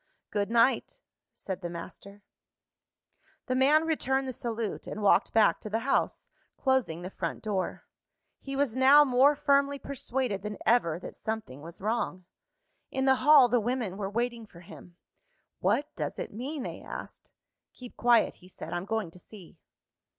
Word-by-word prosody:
"Good 205 -1 -1
night!" 235 - +2 0.4
said 190 -1 -6
the 175 - -4
master. 200 +4 -10 1.2
The 255 - -1
man 285 +5 +4
returned 270 -4 0
the 260 - -4
salute, 230 -2 -4
and 215 - -5
walked 205 +2 +4
back 220 -2 +3
to 215 - -7
the 225 +2 -1
house, 275 - 0 0.3
closing 250 -11 0
the 185 - -6
front - - -5
door. 200 -4 -3 0.5
He 275 0 -6
was 270 -4 0
now 270 +3 +7
more 270 +3 +4
firmly 280 -1 +2
persuaded 255 -6 -3
than 210 0 -5
ever 195 -9 +3
that 175 - -9
something 220 -12 -5
was 170 +4 -11
wrong. 210 -4 -2 0.6
In 265 0 -1
the 265 - +6
hall, 290 -2 +7
the 245 0 +2
women 230 -4 -2
were 195 -1 -4
waiting 235 +1 -3
for 170 -3 -15
him. 175 0 -14 0.6
"What 295 +1 0
does - - -4
it - - -6
mean?" 265 +6 -5
they - - -6
asked. - - -9 0.4
"Keep 250 -2 -12
quiet," 235 -1 +3
he 180 - -17
said; - - -8
"I'm 175 +1 -3
going 220 -5 -2
to 180 - -15
see." 180 -3 -14
230 Hz, 165 wpm, -29 LUFS, 195-265 Hz, 1.2 s, now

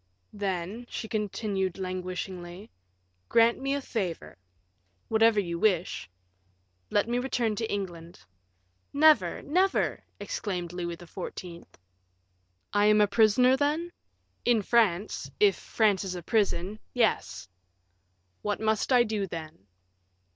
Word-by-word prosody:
"Then," 200 +3 -3
she 220 - -5
continued, 205 -3 -2
languishingly, 185 +1 -5 0.6
"grant 230 0 +4
me 275 +1 -1
a 285 - -2
favor." 190 -10 -4 0.7
"Whatever 225 -1 +4
you 170 -3 -2
wish." 180 - 0 0.8
"Let 205 - +2
me 240 +1 0
return 245 -4 -1
to 225 0 -2
England." 175 -4 -5 0.7
"Never, 310 +1 +4
never!" 370 +6 +1 0.2
exclaimed 180 - -4
Louis 170 -1 -4
XIV. 175 0 -8 1.1
"I 205 0 +4
am 210 0 +5
a 210 - +6
prisoner, 225 +5 +4
then?" 300 +5 0 0.5
"In 235 -3 +3
France 210 -4 +1
if 410 -1 +5
France 210 -4 +1
is 185 -2 -4
a 175 - -6
prison 200 0 0 0.2
yes." 230 - 0 0.9
"What 210 0 -2
must 220 +3 0
I 250 -2 +6
do, 215 -3 -2
then?" 155 - -8
205 Hz, 115 wpm, -28 LUFS, 180-235 Hz, 1.1 s, a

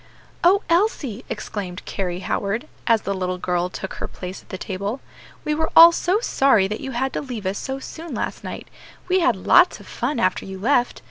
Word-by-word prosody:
"O 390 +4 +5
Elsie!" 335 - +1
exclaimed 200 -4 -5
Carry 180 -2 -3
Howard, 205 +8 -2 0.2
as 230 -3 +3
the 200 - -1
little 185 -1 -2
girl 180 0 -1
took 190 +1 -6
her - - -2
place 185 +1 -8
at - - -27
the 185 - -5
table, 200 +6 -4 0.5
"we 300 - +1
were 320 +1 0
all 335 +1 +11
so 365 +4 +1
sorry 265 - +3
that 210 +2 -5
you 270 - -5
had 260 +3 -1
to - - -2
leave 245 -8 -6
us 190 +2 -1
so 265 0 -4
soon 325 +4 -8
last - - -4
night; - - -7 0.4
we 370 +1 +3
had 345 -1 +3
lots - - +4
of - - -13
fun 250 +2 -2
after 185 -5 +1
you 190 0 -7
left. 245 +4 +1
230 Hz, 205 wpm, -22 LUFS, 190-300 Hz, 0.5 s, all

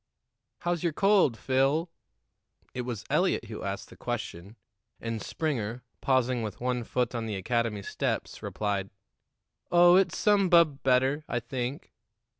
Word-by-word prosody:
"How's 175 -1 -1
your 170 -3 0
cold, 195 - +3
Phil?" 135 - +1 0.9
It 125 - -3
was 120 -4 -5
Eliot - - +2
who - - -7
asked - - -4
the - - -12
question, 95 +6 -5 0.4
and 115 -1 -4
Springer, 125 -7 -3 0.2
pausing 130 -2 +2
with 110 -2 -5
one 125 -1 -1
foot 125 +1 -1
on 115 -2 -3
the 105 - -3
academy 110 +1 -1
steps, - - -3
replied: 100 -2 -2 0.8
"Oh, 175 +1 +7
it's 190 -3 +2
some 205 -3 +3
bub 165 -5 +5
better, 135 +3 +2
I 120 - -1
think." 125 +4 -5
125 Hz, 140 wpm, -28 LUFS, 115-160 Hz, 0.9 s, Oh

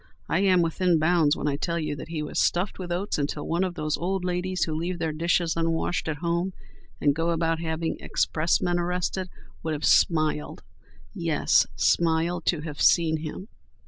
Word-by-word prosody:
I - - +1
am 185 -3 +4
within 170 +1 +2
bounds 160 -2 +3
when - - -2
I 140 -1 0
tell 170 +3 -2
you 155 -3 -2
that - - -7
he 160 -2 -3
was 150 - -3
stuffed 180 +4 0
with 180 -2 -5
oats 180 -1 -1
until 145 +1 -2
one 170 +3 +1
of 180 -2 -2
those 155 -2 -1
old 185 +1 -2
ladies 180 +1 -1
who 160 - -2
leave 170 +3 -2
their 165 -2 -1
dishes 170 +1 +1
unwashed 165 +1 -1
at 155 - -1
home 170 +3 -1 0.5
and 145 - +3
go 165 +3 -1
about 165 -1 0
having 160 0 -2
expressmen 175 +2 0
arrested, 180 +1 -2 0.3
would 160 -1 -2
have 150 - -3
smiled—yes, 155 -2 +1
smiled—to 170 0 +1
have 150 -2 -6
seen 160 -2 +4
him. 160 +5 -7
165 Hz, 175 wpm, -26 LUFS, 155-175 Hz, 0.5 s, am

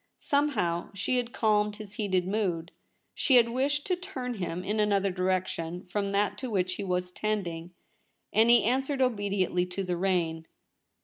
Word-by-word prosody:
Somehow 220 - +1
she 230 +6 0
had 245 -1 -1
calmed 210 -3 +2
his 210 -1 -10
heated 190 -4 0
mood. 185 -5 -1 0.4
She 270 - +3
had 235 -1 +6
wished 280 +4 0
to 365 - +1
turn 280 -9 -5
him 180 -4 -4
in 210 +3 -1
another 200 -2 +2
direction 180 -2 -2
from 200 +2 -2
that 200 +1 0
to 260 - -4
which 185 -4 0
he 200 - -4
was 180 -1 -1
tending, 180 -5 -3 0.6
and 225 +2 +5
he 240 -1 +6
answered 265 +4 0
obediently 200 -6 0
to 180 +2 -4
the 180 -2 -2
rein. 170 -3 0
200 Hz, 165 wpm, -29 LUFS, 180-235 Hz, 0.6 s, had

